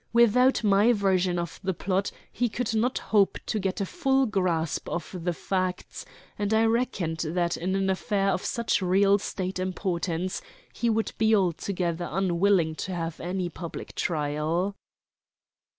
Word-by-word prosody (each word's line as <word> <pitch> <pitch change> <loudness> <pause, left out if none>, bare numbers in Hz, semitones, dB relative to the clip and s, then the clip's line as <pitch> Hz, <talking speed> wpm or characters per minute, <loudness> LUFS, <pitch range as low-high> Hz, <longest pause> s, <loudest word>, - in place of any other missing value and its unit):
Without 235 +2 +4
my 205 +3 +5
version 190 -4 +1
of 170 0 -4
the 190 -1 -1
plot 195 +2 0 0.2
he 245 0 0
could 230 0 -2
not 230 +3 +1
hope 205 -3 +2
to 215 - -1
get 190 0 -2
a 200 - 0
full 270 - +1
grasp 180 - -1
of 170 +2 -4
the 175 - +1
facts, 185 +1 -3 0.3
and 205 +1 +1
I 225 +1 +4
reckoned 225 -8 0
that 170 +1 0
in 185 +3 -2
an 195 0 +1
affair 195 +1 0
of 190 - 0
such 235 -3 0
real 195 +2 +4
State 185 -1 -4
importance 185 -1 -2 0.3
he 235 - 0
would 225 0 0
be 220 0 +4
altogether 175 -2 -1
unwilling 180 -1 +2
to 185 - -4
have 165 -1 -4
any 180 +1 -2
public 170 -1 -7
trial. 160 +5 -1
190 Hz, 150 wpm, -27 LUFS, 175-210 Hz, 0.3 s, my